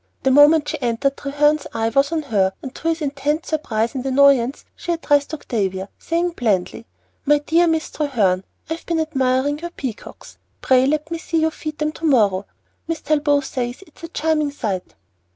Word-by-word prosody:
The 265 - +3
moment 295 +2 +6
she - - -4
entered 245 +3 0
Treherne's 295 +1 +1
eye 225 0 +1
was 275 +5 +2
on 320 -2 -1
her, 195 -8 +1
and 260 - -7
to 325 - -5
his 330 -1 0
intense 290 +2 -2
surprise 235 -7 -1
and 260 -2 -4
annoyance 270 -1 +3
she 345 - -4
addressed 290 -3 +1
Octavia, 195 -10 -3
saying 340 +1 -1
blandly, 225 - -1 0.4
"My 295 +1 +4
dear 330 +4 +2
Miss 320 -1 0
Treherne, 210 -11 +1 0.2
I've 320 +1 -5
been 335 -1 0
admiring 280 -2 0
your 345 +2 -5
peacocks. 260 -9 -8 0.2
Pray 260 0 +3
let 305 +2 -1
me 335 - -3
see 325 0 -1
you 320 0 +2
feed 310 -1 -6
them 305 0 -1
tomorrow. 220 - +2 0.4
Miss 330 -1 -3
Talbot 290 -1 +2
says 250 +3 -4
it 310 - -24
is - - -18
a - - -7
charming 310 -2 0
sight." 205 -10 -4
285 Hz, 180 wpm, -21 LUFS, 245-315 Hz, 0.4 s, moment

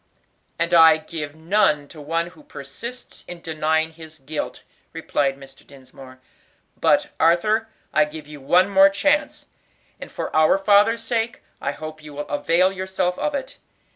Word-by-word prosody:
"And 170 +1 -1
I 160 -2 +8
can 155 - -17
give 150 -3 -5
none 160 -3 +1
to 155 - -11
one 165 +3 -2
who 180 - -18
persists 250 -4 -9
in 175 -1 -8
denying 160 0 -1
his 160 -1 -12
guilt," 150 +2 -6 0.3
replied 135 -2 -1
Mr. 135 -1 -15
Dinsmore. 130 -1 -15 0.6
"But, 295 +1 +2
Arthur, 210 +7 +2 0.2
I 155 - +4
give 150 0 -9
you 150 -1 -11
one 180 +7 +4
more 195 0 +6
chance, 290 +10 0 0.5
and - - -9
for - - -5
our 155 +3 +5
father's 205 +3 +3
sake 230 0 -2 0.2
I - - -2
hope 155 0 -9
you 150 -1 -11
will 145 +1 -5
avail 175 +5 +2
yourself 190 -1 -2
of 295 - -1
it. 270 -1 -6
165 Hz, 160 wpm, -22 LUFS, 150-200 Hz, 0.6 s, I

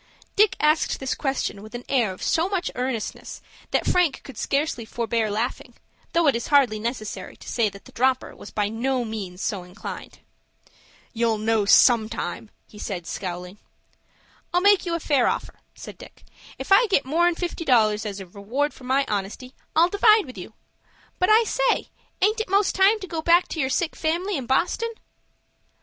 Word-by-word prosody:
Dick 425 -1 +4
asked 305 +1 +2
this 265 -1 -2
question 270 -7 -2
with 215 +2 -11
an 240 - -6
air 245 -7 +1
of 185 - -9
so 330 +3 +1
much 385 -3 -2
earnestness 250 -3 -4 0.3
that - - 0
Frank 355 -6 +2
could 270 - -11
scarcely 275 -1 -1
forbear 230 -1 -1
laughing, 225 +5 -3 0.4
though 335 0 +3
it 280 - +4
is 235 - -3
hardly 265 -7 +3
necessary 225 -1 -5
to - - -14
say 230 -3 +1
that 200 0 -14
the - - -14
dropper 260 +1 0
was - - -11
by 210 -1 -1
no 245 +3 -1
means 195 -5 -6
so 200 -3 -2
inclined. 180 +3 -9 1.0
"You'll 230 -1 +1
know 215 -1 +1
sometime," 220 0 +3 0.2
he 210 - -14
said, 180 -6 -5
scowling. 180 +2 -6 0.9
"I'll 355 - +2
make 405 -1 +4
you 340 - 0
a - - -2
fair 285 -5 +2
offer," - - -3 0.2
said - - -11
Dick. - - -14 0.3
"If - - -8
I 425 +5 +6
get 380 -10 +2
more'n 340 +5 +2
fifty 345 -1 -4
dollars 215 -6 +3
as 205 -2 -5
a 195 - -7
reward 220 +11 -3
for 255 - -14
my 270 +2 +2
honesty, 210 +5 -4 0.2
I'll 330 +2 +6
divide 425 +1 +5
with 255 - -11
you. 190 +3 -9 0.7
But 365 - +2
I 440 +2 +6
say, - - 0 0.3
aint 430 +3 +3
it 440 - -3
most 395 +1 +2
time 395 +3 +4
to 380 - -6
go 330 -1 -4
back 345 +2 +4
to 320 - -5
your 265 -3 +1
sick 325 +5 -1
family 345 +5 -1
in 265 -5 -4
Boston?" 360 - 0
260 Hz, 185 wpm, -24 LUFS, 215-345 Hz, 1.0 s, I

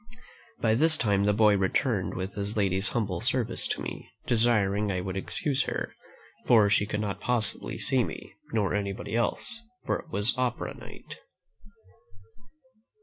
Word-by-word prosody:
By 110 -1 +2
this 155 +7 +4
time 100 -3 +1
the 105 - +3
boy 105 0 +4
returned 95 +2 0
with 95 +1 -4
his 100 +2 -2
lady's 95 -1 +4
humble 100 -7 -1
service 120 -1 0
to - - -3
me, - - -7 0.2
desiring 105 -3 +2
I 90 - -1
would 95 +1 -5
excuse 135 +7 -1
her; - - -4 0.5
for 110 -4 +5
she 105 0 +2
could 105 0 -2
not 100 -2 -4
possibly 120 -3 +1
see - - +2
me, - - -8 0.2
nor 105 -4 0
anybody 100 +1 -3
else, 225 - -1 0.2
for - - 0
it 165 - -13
was 105 -5 +2
opera 125 -2 -2
night." - - -12
105 Hz, 150 wpm, -27 LUFS, 100-120 Hz, 0.5 s, for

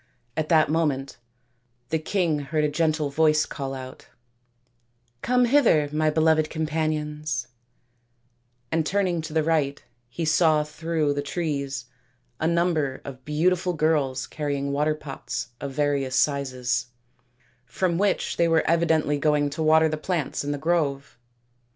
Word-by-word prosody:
At 155 -1 -2
that 160 -2 +5
moment 145 -5 -1 0.7
the 160 - 0
king 160 -2 0
heard 150 +2 -1
a - - +3
gentle 155 -2 0
voice 155 +1 +3
call 135 -2 -5
out, 130 -1 -9 0.6
" 120 -1 -44
Come 250 +3 +3
hither, 230 - +4
my 155 +1 +1
beloved 155 0 +2
companions," 155 -4 -2 1.2
and 160 0 +2
turning 185 -1 0
to 155 0 -7
the 160 0 +1
right 150 -3 0 0.3
he 120 +7 -4
saw 155 -1 +3
through 155 -1 -1
the 145 - -2
trees 145 -3 -3 0.5
a 160 - +1
number 165 -5 0
of 130 -2 -9
beautiful 180 +4 +1
girls 150 -5 +1
carrying 140 -2 -3
water 150 +2 +1
pots 140 -4 -6
of 140 -1 -5
various 140 -2 0
sizes, 130 -3 0 0.8
from 170 +7 -1
which 200 -1 0
they 170 - +3
were 165 -1 +2
evidently 160 -3 +2
going 145 -1 +2
to 160 - -4
water 160 0 +5
the 155 0 -2
plants 155 -3 -2
in 145 - -2
the 145 - -2
grove. 140 -5 -1
155 Hz, 140 wpm, -25 LUFS, 140-160 Hz, 1.2 s, that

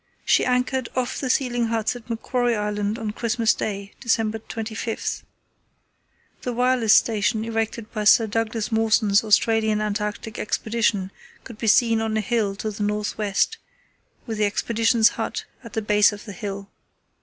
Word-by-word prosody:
She - - +4
anchored 250 0 0
off 255 0 -1
the 260 - -3
sealing 245 -3 +1
huts 225 +1 -1
at 240 -1 -11
Macquarie 240 +1 0
Island 210 0 -2
on 220 -2 -3
Christmas 230 +1 +1
Day, 200 -1 -4
December 225 -3 0
25. 225 0 -4 1.2
The 250 - -3
wireless 245 -2 +3
station 220 0 +2
erected 225 -1 -3
by 215 -2 -2
Sir 225 +2 +6
Douglas 225 +1 -2
Mawson's 220 -2 +3
Australian 220 0 +3
Antarctic 210 +1 -3
Expedition 215 -3 0 0.3
could 235 -4 -11
be 225 - -2
seen 225 +1 +4
on 220 -1 -1
a - - +1
hill 210 -2 0
to 215 +2 -4
the 210 +1 -8
north 210 0 -1
west 210 - +1 0.7
with 225 -3 -4
the 210 - +3
Expedition's 225 +2 +2
hut - - -4 0.2
at 230 - -11
the 220 - -2
base 210 0 +4
of 205 +1 -9
the 205 - -8
hill. 200 -2 -6
220 Hz, 155 wpm, -23 LUFS, 210-230 Hz, 1.2 s, Sir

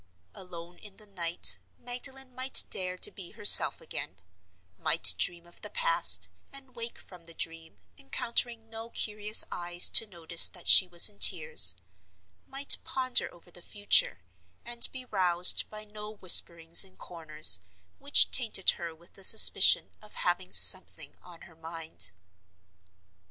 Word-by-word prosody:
Alone 175 -2 -15
in 205 -2 -19
the 215 - -18
night, 175 -4 -1 0.2
Magdalen 255 +2 -9
might 260 +1 -1
dare 185 -1 -5
to - - +4
be 185 -3 -13
herself - - +6
again—might 90 - -5
dream 170 -1 -5
of 175 - -22
the - - -12
past, - - 0 0.2
and 270 -2 -16
wake 230 0 -9
from 180 -3 -19
the 165 -1 -13
dream, 165 -9 -11 0.2
encountering 230 - -7
no 225 +1 -13
curious 210 -1 0
eyes 175 0 -2
to 225 - +3
notice 170 -3 -2
that 175 - -14
she 185 - +4
was 175 -1 +6
in 100 - -8
tears—might 90 - +1
ponder 255 -1 -5
over 175 0 -22
the 175 - -14
future, 205 - -3 0.4
and 240 0 +1
be 260 -1 -12
roused 180 -5 -1
by 215 0 -14
no 210 0 -13
whisperings 170 -4 +3
in 190 -1 -19
corners, 155 - -3 0.4
which 280 +1 0
tainted 225 -6 -1
her 170 -2 -12
with 170 +2 -24
the 195 - -12
suspicion 220 +3 +4
of - - -18
"having - - -5
something - - +4
on 175 -2 -19
her 165 - -20
mind." 160 - -6
175 Hz, 140 wpm, -25 LUFS, 165-220 Hz, 0.4 s, herself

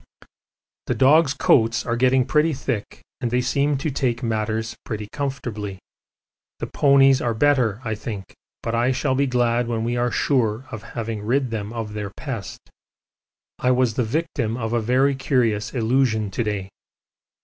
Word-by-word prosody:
The - - 0
dogs' 140 +2 +4
coats 115 -2 +3
are 120 - 0
getting 130 +1 +3
pretty 150 +3 +2
thick, 120 -5 -4 0.2
and 120 - -1
they 125 +2 +1
seem 140 +3 +1
to 145 +3 -2
take 125 -2 -1
matters 110 0 -1
pretty 105 -2 -5
comfortably. 120 -8 -4 0.8
The - - -4
ponies 135 -1 +4
are 115 -2 0
better, 125 -5 +2
I 110 - -2
think, 105 -3 -6 0.3
but 115 - -2
I 120 +3 +2
shall 130 +1 0
be 140 +1 +2
glad 120 -1 +1
when 115 -1 -1
we 120 +1 -1
are 120 0 +1
sure 120 -3 0
of 110 - -6 0.2
having 115 -2 -3
rid 125 +3 0
them 105 -2 -4
of 115 -3 -5
their 105 -1 -4
pest. 115 -2 -6 1.0
I 125 - +1
was 125 -2 +3
the 125 - 0
victim 120 -3 -2
of 115 -1 -3
a 120 - +2
very 130 +5 +3
curious 120 -6 0
illusion 115 -4 +1
to 120 - -1
day. 100 -3 -3
120 Hz, 165 wpm, -23 LUFS, 110-130 Hz, 1.0 s, dogs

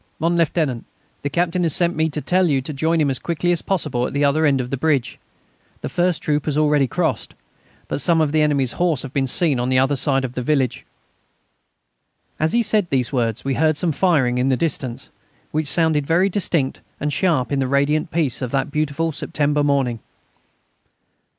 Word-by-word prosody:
"Mon 170 +2 0
Lieutenant, 155 -7 0 0.4
the 145 - -2
Captain 175 +3 0
has 165 -4 +1
sent 175 0 +1
me 160 +1 +1
to 150 0 -4
tell 185 +3 +2
you 140 -2 +2
to 140 +4 -6
join 160 +4 0
him 145 -3 +2
as 130 - -2
quickly 170 +3 -1
as 170 - +1
possible 125 -10 -1
at - - -8
the 145 +1 +1
other 155 +2 +2
end 135 -2 +2
of 125 0 -4
the - - 0
bridge. 135 -5 0 0.6
The - - -4
first 175 -3 0
troop 150 -1 0
has 150 -2 -1
already 150 -3 +3
crossed, - - -2 0.5
but - - -3
some 170 -2 +3
of 155 -2 +1
the 155 0 +2
enemy's 140 -4 +1
horse 170 -6 0
have 130 - -8
been 135 -1 0
seen 145 -1 +2
on 125 +1 -1
the 130 - +2
other 135 +2 +2
side 135 -1 +1
of 125 - -6
the 125 - -3
village." 130 -2 -1 1.5
As 155 +1 0
he 235 - +3
said 210 -3 +1
these 130 -1 0
words 115 -2 -1
we 135 - 0
heard 155 +1 +1
some 170 +1 0
firing 140 -7 +1
in 130 +2 +1
the 130 - +2
distance, 130 -6 -3 0.4
which 155 0 -1
sounded 155 -2 +2
very 180 +4 +3
distinct 170 -8 -1 0.2
and 150 0 -2
sharp 155 -11 0
in 140 - 0
the 135 - 0
radiant 140 +4 +1
peace 155 -8 -1
of 125 - -2
that 135 +3 -1
beautiful 155 +2 -1
September 145 0 -1
morning. 135 -5 0
150 Hz, 205 wpm, -20 LUFS, 135-165 Hz, 1.5 s, already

